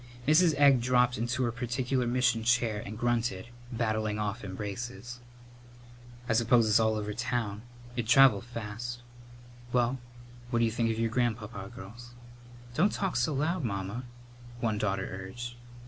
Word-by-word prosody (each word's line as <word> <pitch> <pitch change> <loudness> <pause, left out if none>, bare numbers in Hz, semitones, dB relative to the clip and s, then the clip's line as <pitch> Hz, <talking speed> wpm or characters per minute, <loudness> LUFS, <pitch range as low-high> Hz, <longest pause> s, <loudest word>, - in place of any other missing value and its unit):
Mrs. 160 +1 +5
Egg 140 -3 +6
dropped 125 -1 +3
into 120 +2 0
her 120 - +1
particular 125 +1 -1
mission 125 -2 +2
chair 115 -3 +2
and 105 +2 -7
grunted, 120 -3 -1 0.2
batting 110 -2 -1
off 105 +2 -3
embraces. 105 +4 -6 1.1
"I 115 - +2
suppose 115 0 +4
it's 105 +1 +5
all 110 -1 +2
over 105 0 -3
town? 115 -3 -2 0.3
It'd 115 -2 -3
travel 125 -5 +7
fast. 120 +1 -6 0.7
Well, 125 +1 +1 0.5
what 120 - 0
d'you 115 -1 +3
think 115 0 0
of 110 - -1
your 115 0 0
grandpapa, 110 -4 -2
girls?" 120 +3 -11 0.6
"Don't 180 +10 +3
talk 195 -3 -2
so 160 - +2
loud, 160 +4 0
Mamma," 100 +2 -3 0.5
one 110 -3 0
daughter 95 -2 -1
urged. 95 +6 -6
120 Hz, 145 wpm, -30 LUFS, 110-125 Hz, 1.1 s, travel